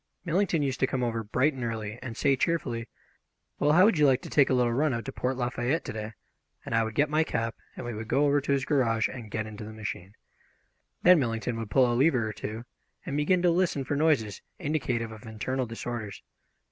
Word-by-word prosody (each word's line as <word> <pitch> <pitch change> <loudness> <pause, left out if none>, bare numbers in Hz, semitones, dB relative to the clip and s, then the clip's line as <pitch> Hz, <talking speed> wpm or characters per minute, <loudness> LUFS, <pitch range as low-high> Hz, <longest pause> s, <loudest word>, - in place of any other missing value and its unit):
Millington 170 -2 +1
used 135 -2 -2
to 130 - +3
come 130 -1 -1
over 115 -1 -1
bright 130 +8 +1
and 130 -2 -6
early 110 -1 -4
and 120 -3 -7
say 140 -1 +3
cheerfully, 125 -6 -1 0.7
"Well, 150 +1 +3
how 180 +4 +7
would 205 -7 +3
you 150 - +6
like 130 -1 +2
to - - -8
take 145 -3 +4
a - - +2
little 120 -2 +2
run 140 +1 +1
out 115 - -4
to 135 - -4
Port 130 0 -2
Lafayette 125 +4 -1
to - - -5
day?" 110 0 -5 0.5
and - - -5
I 115 0 +3
would 110 0 -5
get 145 - +3
my 155 +2 +2
cap, 115 -5 -2 0.2
and - - -6
we 120 - -4
would 110 +1 -6
go 140 +6 +2
over 145 0 +3
to 140 - -2
his 135 -2 +1
garage 115 -7 +2
and 120 -5 -8
get 110 +1 -3
into 110 0 -8
the 110 +1 -8
machine. 105 -2 -6 0.9
Then 180 -1 +7
Millington 115 -2 -1
would 115 -2 -5
pull 130 +4 +4
a 120 - +1
lever 125 -2 +3
or 105 - -4
two, 110 +3 -6 0.4
and 145 -6 -3
begin 175 +5 +2
to 175 - +5
listen 170 -5 +1
for 140 +2 -2
noises 140 -9 +1 0.2
indicative 130 -8 -2
of 110 +1 -11
internal 125 +4 -2
disorders. 115 -2 -6
125 Hz, 230 wpm, -28 LUFS, 115-145 Hz, 0.9 s, how